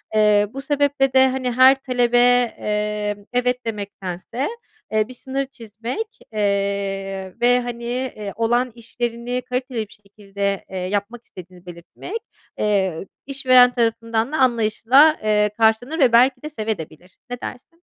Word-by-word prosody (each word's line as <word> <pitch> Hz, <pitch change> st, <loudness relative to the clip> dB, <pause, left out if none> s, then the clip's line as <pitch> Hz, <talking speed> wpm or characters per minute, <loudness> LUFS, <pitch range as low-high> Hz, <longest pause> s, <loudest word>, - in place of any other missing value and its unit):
Eee, 210 Hz, -1 st, +4 dB
bu 270 Hz, -, -5 dB
sebeple 285 Hz, -1 st, +1 dB
de, 265 Hz, 0 st, +6 dB
hani, 255 Hz, -1 st, -2 dB
her 260 Hz, +2 st, +7 dB
talebe, 245 Hz, -2 st, +1 dB
eee, 210 Hz, -4 st, +1 dB
"evet" 250 Hz, 0 st, 0 dB
demektense, 205 Hz, +2 st, -4 dB, 0.4 s
eee, 215 Hz, 0 st, +1 dB
bir 255 Hz, -, -10 dB
sınır 270 Hz, +2 st, -4 dB
çizmek, 245 Hz, -, -7 dB
eee, 195 Hz, -2 st, -2 dB
ve, 245 Hz, +1 st, +4 dB
hani, 240 Hz, -1 st, -6 dB, 0.3 s
iii, 205 Hz, -2 st, -6 dB
olan 240 Hz, +3 st, +1 dB
işlerini 240 Hz, +1 st, -4 dB
kaliteli 250 Hz, -4 st, -3 dB
bir -, -, -17 dB
şekilde, 200 Hz, -1 st, -5 dB
eee, 190 Hz, -, -6 dB
yapmak 205 Hz, +6 st, -3 dB
istediğini 180 Hz, 0 st, -13 dB
belirtmek, 175 Hz, -, -8 dB, 0.4 s
eee, 195 Hz, -4 st, 0 dB, 0.2 s
işveren 255 Hz, -2 st, +5 dB
tarafından 230 Hz, +1 st, 0 dB
da 310 Hz, -, -1 dB
anlayışla, 255 Hz, +5 st, +4 dB
eee, 210 Hz, -1 st, +2 dB
karşılanır 230 Hz, +8 st, +2 dB
ve 260 Hz, -4 st, +5 dB
belki 250 Hz, +2 st, +4 dB
de 305 Hz, -, -6 dB
sevebilir 215 Hz, -, -4 dB
de. 245 Hz, +6 st, -12 dB
Ne 245 Hz, -, -20 dB
dersin? 330 Hz, +7 st, -9 dB
230 Hz, 135 wpm, -21 LUFS, 205-255 Hz, 0.4 s, her